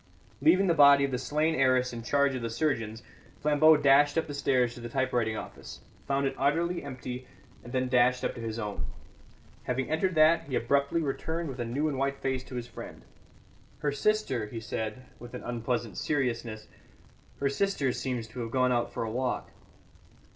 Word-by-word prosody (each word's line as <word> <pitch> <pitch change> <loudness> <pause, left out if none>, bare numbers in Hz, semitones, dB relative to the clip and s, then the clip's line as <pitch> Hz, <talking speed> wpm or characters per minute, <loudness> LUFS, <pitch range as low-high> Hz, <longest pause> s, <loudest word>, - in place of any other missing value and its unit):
Leaving 175 +7 +5
the 175 - +3
body 140 -2 +7
of 135 - -4
the 125 - -1
slain 150 +4 +1
heiress 130 -3 +2
in 115 - -5
charge 140 +3 +2
of 130 - -3
the 115 - -2
surgeons, 115 -5 -2 0.4
Flambeau 150 +1 +5
dashed 145 +1 +4
up 165 - +2
the 145 - -7
stairs 130 -4 +1
to - - -11
the 120 0 -6
typewriting 120 -4 0
office, - - -9 0.3
found 140 0 +1
it 135 - 0
utterly 165 +5 +1
empty, 125 -2 -7 0.4
and 120 - -10
then 130 0 0
dashed 125 0 +3
up - - -1
to 120 - -8
his 115 -1 -4
own. 105 - -4 0.8
Having 130 +3 -2
entered 175 +3 +1
that, 160 +1 +5
he 135 - -3
abruptly 140 +6 +1
returned 160 +3 -3
with 130 -1 -7
a 120 - -1
new 135 +7 -1
and 140 -3 -2
white 140 0 0
face 130 -1 -2
to 130 - -9
his 120 -1 -3
friend. 120 - -10 0.7
"Her 145 - -1
sister," 140 - 0
he 115 +2 -6
said, 110 +2 -5
with 120 0 -9
an - - -7
unpleasant 120 -1 -3
seriousness, 115 -6 -2 0.7
"her 140 - +1
sister 140 -4 0
seems 125 -4 -3
to 125 - -9
have 115 -1 -3
gone 125 +1 +2
out 120 -1 0
for - - -3
a 110 - -3
walk." 125 +2 -2
130 Hz, 190 wpm, -29 LUFS, 120-145 Hz, 0.8 s, body